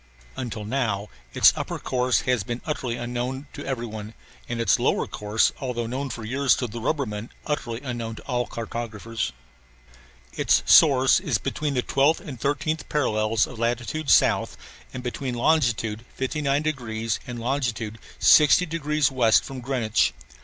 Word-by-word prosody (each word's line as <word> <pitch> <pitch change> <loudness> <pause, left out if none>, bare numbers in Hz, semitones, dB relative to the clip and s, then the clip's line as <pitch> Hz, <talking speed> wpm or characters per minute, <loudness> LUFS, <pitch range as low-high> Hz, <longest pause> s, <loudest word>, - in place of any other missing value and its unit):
Until 115 -5 -5
now 105 -4 -1 0.3
its - - +7
upper - - -4
course 125 -1 +1
has 125 -3 +1
been 120 +4 -4
utterly 130 -6 -2
unknown 125 +3 -3
to - - -7
every 130 -3 -3
one, 110 -1 -8 0.3
and 120 -1 -3
its 115 -5 +3
lower - - +1
course 105 +1 +1
although 125 -3 -2
known 130 +4 -3
for 115 - -6
years 135 +4 +2
to 125 - -2
the 115 0 -6
rubbermen 115 -5 -2 0.2
utterly 120 -5 -3
unknown 120 -4 -4
to - - -11
all 125 -2 -1
cartographers. 115 -1 -4 1.0
Its - - +2
source 135 -3 +6
is 150 - 0
between 145 +6 -3
the 125 - +1
12th 140 +4 +2
and 140 - -9
13th 145 +3 -1
parallels 110 -6 +1
of 125 - -10
latitude 120 +6 -2
south, - - +3 0.3
and 125 - -7
between 125 +1 -3
longitude 120 -6 +1
59 140 +2 0
degrees 115 -7 -2
and 125 -1 -5
longitude 115 -3 -2 0.2
60 155 +4 +6
degrees 150 -4 0
west 120 -4 +4
from 135 -1 -7
Greenwich. 120 - +1
125 Hz, 155 wpm, -25 LUFS, 115-140 Hz, 1.0 s, its